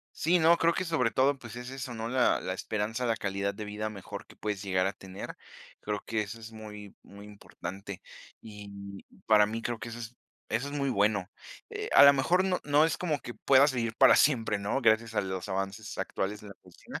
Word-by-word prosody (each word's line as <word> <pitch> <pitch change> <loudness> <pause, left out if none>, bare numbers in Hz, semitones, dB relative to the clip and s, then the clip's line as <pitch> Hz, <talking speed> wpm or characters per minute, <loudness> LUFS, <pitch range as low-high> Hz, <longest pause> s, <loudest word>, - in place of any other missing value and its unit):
Sí, 175 +3 +3
no, 165 +1 +6
creo 170 0 +3
que 185 - -1
sobre 160 -9 +1
todo, 135 +3 +2
pues, 115 -3 -10
es 125 +1 -7
eso 130 -2 -6
¿no?, 115 0 -4
la 125 0 +2
la 95 - -3
esperanza, 110 +5 -2
la 115 -1 +1
calidad 100 0 -2
de 105 +1 -6
vida 105 +1 -4
mejor 100 -3 -8
que - - -16
puedes 105 -2 -3
llegar 95 -2 +1
a 95 - 0
tener. 95 -1 -9 0.4
Creo 105 0 -3
que 110 -1 -1
eso 110 +3 -8
es 110 0 -9
muy 105 -2 -10
muy 100 +1 -13
importante, 100 -2 -8 0.4
y 100 -2 -10 0.2
para 105 -2 +6
mí 115 +2 -4
creo 120 -1 -3
que 115 +1 -7
es 115 0 -8 0.3
eso 120 +5 0
es - - -7
muy 140 -1 -1
bueno. 100 -4 +1 0.4
Eh, - - -5
a - - +9
lo 140 - +10
mejor 175 +7 +2
no 185 -1 +1
no 145 +1 +4
es 160 - +1
como 160 -5 -1
que 120 - -8
pueda 135 +1 +5
seguir 115 -4 -2
para 130 - +7
siempre, 115 -7 +3
¿no?, 100 +7 -1
gracias 115 -1 +2
a - - +3
los 95 0 -4
avances 95 +2 -4
actuales 100 +2 -3
de 105 - -11
la 100 - -10
cocina, - - -11
110 Hz, 220 wpm, -29 LUFS, 100-130 Hz, 0.4 s, lo